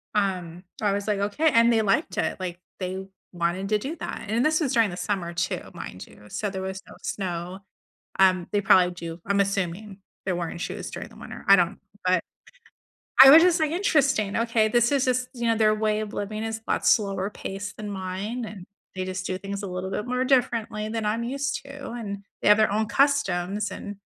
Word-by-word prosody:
Um, 180 Hz, -3 st, -1 dB, 0.2 s
I 205 Hz, -2 st, +2 dB
was 200 Hz, +1 st, -2 dB
like, 205 Hz, -2 st, +1 dB
"Okay" 255 Hz, +11 st, +2 dB
and 230 Hz, +1 st, +5 dB
they 225 Hz, -1 st, +3 dB
liked 200 Hz, -2 st, 0 dB
it, -, -, -1 dB
like, 180 Hz, -1 st, -5 dB, 0.2 s
they 190 Hz, +1 st, -4 dB, 0.3 s
wanted 175 Hz, +3 st, -1 dB
to 215 Hz, -, +3 dB
do 280 Hz, +10 st, -5 dB
that. -, -, -6 dB
And 230 Hz, +5 st, +1 dB
this 310 Hz, +1 st, +3 dB
is 275 Hz, -3 st, 0 dB
during 225 Hz, -4 st, +4 dB
the 175 Hz, -, -7 dB
summer 180 Hz, -4 st, -2 dB
too, 170 Hz, -, -1 dB
mind 90 Hz, -, -8 dB
you, 105 Hz, -, -17 dB
so 210 Hz, -, -2 dB
there 190 Hz, -1 st, -5 dB
was 190 Hz, 0 st, -5 dB
no -, -, -13 dB
snow, 180 Hz, -1 st, -4 dB, 0.6 s
um, 185 Hz, -2 st, +4 dB
they 205 Hz, -, +2 dB
probably 180 Hz, -2 st, +5 dB
do. 170 Hz, -1 st, -7 dB
I'm 200 Hz, 0 st, +2 dB
assuming 195 Hz, +1 st, -2 dB, 0.3 s
they're 185 Hz, -2 st, -1 dB
wearing 170 Hz, -1 st, -4 dB
shoes -, -, -5 dB
during -, -, -7 dB
the -, -, -17 dB
winter. -, -, -9 dB
I 195 Hz, -, +8 dB
don't, 180 Hz, +3 st, +1 dB, 0.3 s
but 185 Hz, -1 st, +3 dB, 1.0 s
I 270 Hz, -, +12 dB
was 320 Hz, +4 st, +10 dB
just 350 Hz, -2 st, +4 dB
like, 310 Hz, -1 st, +1 dB
"Interesting, 275 Hz, -, +2 dB
okay, 230 Hz, -2 st, +2 dB
this 240 Hz, +3 st, +3 dB
is 275 Hz, -1 st, +2 dB
just, 255 Hz, 0 st, +1 dB
you 240 Hz, -1 st, -2 dB
know, 225 Hz, -, +3 dB
their 215 Hz, -1 st, +4 dB
way 215 Hz, 0 st, 0 dB
of 215 Hz, -1 st, -5 dB
living 215 Hz, +2 st, -4 dB
is 225 Hz, 0 st, -3 dB
a -, -, -2 dB
lot -, -, 0 dB
slower 195 Hz, -2 st, +2 dB
pace 200 Hz, 0 st, -6 dB
than 210 Hz, -1 st, -7 dB
mine, 200 Hz, +5 st, -4 dB
and 200 Hz, -4 st, -9 dB, 0.3 s
they 185 Hz, -, -2 dB
just 185 Hz, +1 st, -4 dB
do 185 Hz, -, -2 dB
things 200 Hz, +1 st, -6 dB
a -, -, -3 dB
little 185 Hz, +1 st, -4 dB
bit 210 Hz, -, -2 dB
more 250 Hz, +1 st, 0 dB
differently 230 Hz, -5 st, +1 dB
than 225 Hz, -1 st, -2 dB
I'm 225 Hz, +2 st, 0 dB
used 275 Hz, +3 st, -2 dB
to, 275 Hz, -2 st, -8 dB
and 200 Hz, -4 st, -6 dB, 0.2 s
they -, -, 0 dB
have 210 Hz, 0 st, +8 dB
their 215 Hz, -2 st, +3 dB
own 215 Hz, +1 st, +1 dB
customs," 210 Hz, -9 st, +1 dB
and 205 Hz, -1 st, -7 dB
205 Hz, 215 wpm, -25 LUFS, 185-230 Hz, 1.0 s, I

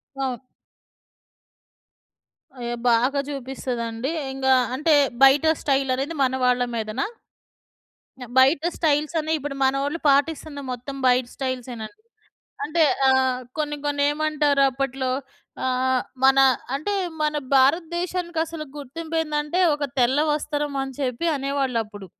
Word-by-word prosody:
అవును. 265 Hz, -2 st, -2 dB, 2.2 s
అయ్యో! 240 Hz, -1 st, -4 dB
బాగా 250 Hz, +5 st, +2 dB
చూపిస్తదండి. 255 Hz, -2 st, -4 dB, 0.2 s
ఇంగా 265 Hz, 0 st, +2 dB, 0.2 s
అంటే, 305 Hz, +3 st, +2 dB, 0.3 s
బయట 270 Hz, +3 st, +6 dB, 0.2 s
స్టైల్ 270 Hz, -1 st, +1 dB
అనేది 280 Hz, +6 st, -3 dB
మన 260 Hz, 0 st, +1 dB
వాళ్ళ 250 Hz, 0 st, +3 dB
మీదనా? 220 Hz, -, -2 dB, 1.3 s
బయట 270 Hz, +3 st, +5 dB, 0.2 s
స్టైల్స్ 305 Hz, 0 st, +1 dB
అనే 315 Hz, 0 st, -3 dB
ఇప్పుడు 285 Hz, -1 st, -5 dB
మనోళ్ళు 275 Hz, +4 st, 0 dB
పాటిస్తున్న 285 Hz, +1 st, +1 dB
మొత్తం 250 Hz, +3 st, -6 dB
బయట 250 Hz, 0 st, +3 dB
స్టయిల్సే 255 Hz, -2 st, -4 dB
నండి. 315 Hz, -, -9 dB, 0.6 s
అంటే 315 Hz, +3 st, +1 dB, 0.3 s
అహ్, 260 Hz, -1 st, +2 dB, 0.2 s
కొన్ని, 295 Hz, -1 st, -2 dB
కొన్ని 290 Hz, -1 st, 0 dB
ఏమంటారు 295 Hz, -2 st, +1 dB
అప్పట్లో? 265 Hz, 0 st, -2 dB, 0.5 s
ఆహ్, 255 Hz, 0 st, +1 dB, 0.2 s
మన 270 Hz, 0 st, +6 dB, 0.4 s
అంటే 310 Hz, +9 st, -2 dB, 0.3 s
మన 300 Hz, 0 st, 0 dB, 0.2 s
భారతదేశానికి 345 Hz, +4 st, +1 dB
అసలు 325 Hz, -1 st, -7 dB
గుర్తింపు 315 Hz, +4 st, -6 dB
ఏందంటే, 300 Hz, +2 st, -1 dB
ఒక 295 Hz, 0 st, -3 dB
తెల్ల 255 Hz, +3 st, +3 dB
వస్త్రం 295 Hz, -1 st, -2 dB
అని 270 Hz, 0 st, -6 dB
చెప్పి 260 Hz, +4 st, -1 dB
అనేవాళ్ళు 275 Hz, -3 st, -1 dB
అప్పుడు. 205 Hz, -2 st, -11 dB
275 Hz, 115 wpm, -23 LUFS, 255-300 Hz, 2.2 s, బయట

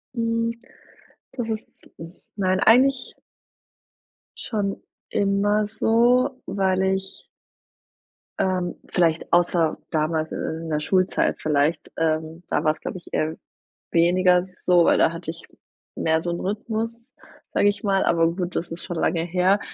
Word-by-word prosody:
Hm, 230 Hz, 0 st, -1 dB, 0.7 s
das 235 Hz, -3 st, -4 dB
ist 220 Hz, 0 st, -4 dB
zi -, -, -21 dB, 0.5 s
nein, 185 Hz, -1 st, +1 dB
eigentlich 255 Hz, +3 st, +4 dB, 1.2 s
schon 205 Hz, -3 st, -3 dB, 0.3 s
immer 205 Hz, +1 st, +1 dB
so, 245 Hz, +5 st, +2 dB
weil 190 Hz, -1 st, 0 dB
ich 190 Hz, 0 st, -2 dB, 1.1 s
Ähm, 185 Hz, -2 st, 0 dB
vielleicht, 165 Hz, -2 st, +1 dB
außer 175 Hz, -2 st, +3 dB
damals 155 Hz, 0 st, 0 dB
in 160 Hz, +1 st, -4 dB
der 150 Hz, -1 st, 0 dB
Schultzeit 185 Hz, +4 st, +1 dB
vielleicht, 150 Hz, +1 st, 0 dB
ähm, 160 Hz, +1 st, -1 dB
da -, -, 0 dB
war's 155 Hz, 0 st, +1 dB
glaube -, -, -5 dB
ich 175 Hz, -, -14 dB
eher 155 Hz, +1 st, 0 dB, 0.6 s
weniger 180 Hz, +1 st, +4 dB, 0.2 s
so, 175 Hz, -2 st, +5 dB
weil -, -, +4 dB
da 160 Hz, -, +4 dB
hatte 165 Hz, -1 st, -7 dB
ich 165 Hz, -, -13 dB, 0.5 s
mehr 160 Hz, 0 st, +1 dB
so 175 Hz, -, -3 dB
'n 170 Hz, -, -3 dB
Rythmus, 220 Hz, +3 st, -2 dB, 0.6 s
sage 205 Hz, -, +3 dB
ich 205 Hz, -, -4 dB
mal. 195 Hz, -1 st, +2 dB
Aber 165 Hz, 0 st, +2 dB
gut, 180 Hz, -1 st, -4 dB
das 170 Hz, -, -2 dB
ist 165 Hz, +1 st, -7 dB
schon 175 Hz, -, -5 dB
lange 165 Hz, 0 st, +1 dB
her. 180 Hz, +4 st, +2 dB
185 Hz, 135 wpm, -23 LUFS, 165-210 Hz, 1.2 s, so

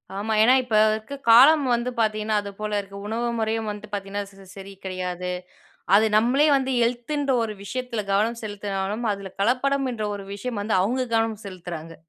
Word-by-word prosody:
ஆமா. 215 Hz, +2 st, -2 dB
ஏன்னா 245 Hz, +4 st, +6 dB
இப்ப 230 Hz, -3 st, -2 dB, 0.2 s
இருக்க 220 Hz, +5 st, -4 dB, 0.2 s
காலம் 275 Hz, +5 st, +8 dB
வந்து 240 Hz, +1 st, -2 dB
பாத்தீங்கன்னா, 215 Hz, 0 st, 0 dB
அது 200 Hz, 0 st, -7 dB
போல 210 Hz, -1 st, -2 dB
இருக்கு. 200 Hz, 0 st, -12 dB
உணவு 235 Hz, +2 st, -1 dB
முறையும் 220 Hz, 0 st, -1 dB
வந்து 210 Hz, 0 st, -9 dB
பாத்தீங்கன்னா 200 Hz, 0 st, -3 dB
ச 195 Hz, 0 st, -16 dB
சரி 195 Hz, 0 st, -9 dB
கிடையாது. 180 Hz, -1 st, -4 dB, 0.6 s
அது 220 Hz, +2 st, +5 dB
நம்மளே 260 Hz, +7 st, +3 dB
வந்து 265 Hz, -1 st, 0 dB
ஹெல்த்துன்ற 255 Hz, +4 st, 0 dB
ஒரு 215 Hz, -1 st, -3 dB
விஷயத்தில 250 Hz, 0 st, -3 dB
கவனம் 225 Hz, +4 st, +1 dB
செலுத்தினாலும், 205 Hz, +1 st, -3 dB
அதில 195 Hz, -2 st, -6 dB
கலப்படம்ன்ற 250 Hz, -1 st, 0 dB
ஒரு 195 Hz, -1 st, -8 dB
விஷயம் 220 Hz, +1 st, -4 dB
வந்து 215 Hz, 0 st, 0 dB
அவுங்க 250 Hz, +6 st, 0 dB
கவனம் 225 Hz, -1 st, 0 dB
செலுத்துறாங்க. 170 Hz, -3 st, -7 dB
215 Hz, 165 wpm, -24 LUFS, 200-240 Hz, 0.6 s, காலம்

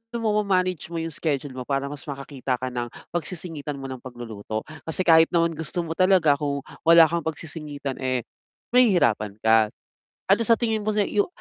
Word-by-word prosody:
mo 225 Hz, -2 st, 0 dB
ma-manage 185 Hz, -3 st, 0 dB
mo -, -, -5 dB
yung 165 Hz, 0 st, -3 dB
schedule 145 Hz, -3 st, -2 dB
mo 130 Hz, -, -5 dB
para 140 Hz, 0 st, 0 dB
mas 145 Hz, -1 st, -7 dB
makakita 140 Hz, -2 st, -3 dB
ka 130 Hz, 0 st, -3 dB
ng 120 Hz, -1 st, -3 dB, 0.2 s
pagsisingitan 160 Hz, -3 st, -4 dB
mo 135 Hz, -, -6 dB
ng 130 Hz, -1 st, -6 dB
pagluluto, 115 Hz, -4 st, -6 dB, 0.2 s
kasi 165 Hz, +3 st, 0 dB
kahit 165 Hz, -2 st, +6 dB
naman 170 Hz, -1 st, +2 dB
gusto 160 Hz, +3 st, -3 dB
mo 165 Hz, -, -6 dB
talaga 185 Hz, -6 st, +4 dB
kung 140 Hz, -2 st, -2 dB, 0.2 s
wala 165 Hz, 0 st, +9 dB
kang 170 Hz, +2 st, -2 dB
pagsisingitan, 150 Hz, -3 st, -5 dB
eh, 130 Hz, -2 st, -1 dB, 0.5 s
mahihirapan 145 Hz, -, +3 dB
ka. 110 Hz, -1 st, +4 dB, 0.6 s
Ano 195 Hz, +4 st, +5 dB
sa 230 Hz, +1 st, +5 dB
tingin 225 Hz, -3 st, 0 dB
mo -, -, +1 dB
na 210 Hz, -1 st, +3 dB
yu 205 Hz, -, +1 dB
150 Hz, 180 wpm, -24 LUFS, 130-175 Hz, 0.6 s, wala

